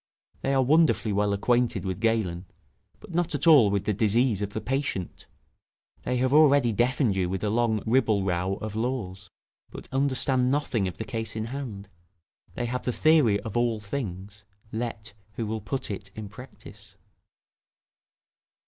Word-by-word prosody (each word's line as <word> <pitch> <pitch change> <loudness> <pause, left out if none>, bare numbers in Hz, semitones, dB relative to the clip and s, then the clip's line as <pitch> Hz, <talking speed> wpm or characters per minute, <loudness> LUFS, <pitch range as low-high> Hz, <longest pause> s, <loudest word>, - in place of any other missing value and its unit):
They 135 0 0
are 135 - +4
wonderfully 145 -6 +3
well 105 0 +1
acquainted 115 -1 +1
with 95 -1 -3
Galen, 100 -6 0 0.5
but - - -13
not 175 -2 0
at 145 - -2
all 145 -10 +7
with 100 0 -1
the 105 - +1
disease 110 +1 +2
of 100 - -2
the - - -2
patient; 130 -8 -3 0.8
they 125 0 0
have 130 +2 +1
already 140 -6 +5
deafened 120 -1 +1
you 90 -2 0
with 95 +1 -3
a 105 - 0
long 110 -2 +1
ribble 110 -4 +2
row 90 +1 -1
of 105 +1 -6
laws, 110 -5 -3 0.4
but - - -10
understand 130 -1 +1
nothing 130 -8 0
of 90 - -6
the 110 - -5
case 115 -3 -4
in 110 0 -3
hand; 110 -8 -6 0.7
they 120 - -2
have 125 +1 -3
the 125 - -1
theory 145 -8 +4
of 110 -1 -7
all 120 -2 +1
things, 105 -3 -6 0.3
let 110 -2 -5 0.2
who 115 - -3
will 110 +1 -3
put 130 +3 -4
it 100 0 -6
in 110 -2 -7
practice. 125 +6 -14
110 Hz, 165 wpm, -26 LUFS, 100-130 Hz, 0.8 s, all